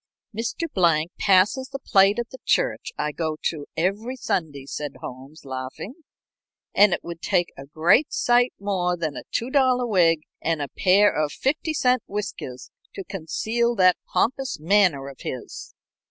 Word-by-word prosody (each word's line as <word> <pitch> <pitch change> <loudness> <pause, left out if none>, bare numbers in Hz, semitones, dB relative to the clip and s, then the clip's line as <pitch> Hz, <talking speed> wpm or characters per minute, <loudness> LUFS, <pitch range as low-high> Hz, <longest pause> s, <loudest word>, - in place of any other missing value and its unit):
"Mr. 230 +9 -3
Blank 170 -3 +2
passes 200 +8 +3
the 275 - -5
plate 200 -5 +3
at 240 0 -4
the 260 - -10
church - - 0
I 150 - -1
go 155 0 -3
to 150 -3 -2
every 205 +9 -1
Sunday," 155 - -3
said 145 +1 -5
Holmes, 135 +5 -10
laughing, 130 - -6 0.8
"and 205 -1 +6
it - - -1
would 170 -1 -8
take 175 -3 +1
a 135 0 -11
great 170 - +3
sight 245 +1 +3
more 185 -3 -1
than 160 -4 -3
a - - -7
two 235 +3 -2
dollar 255 -3 +3
wig 170 -7 +3 0.2
and 165 -1 0
a 145 -2 -3
pair 200 +2 +4
of 150 -1 0
fifty 310 - -1
cent 250 -3 +2
whiskers 165 -11 -6 0.2
to 195 - -5
conceal 220 +7 -1
that 185 -3 +5
pompous 260 - 0
manner 170 -5 +3
of 135 -1 -10
his." 125 - -7
185 Hz, 160 wpm, -24 LUFS, 155-235 Hz, 0.8 s, and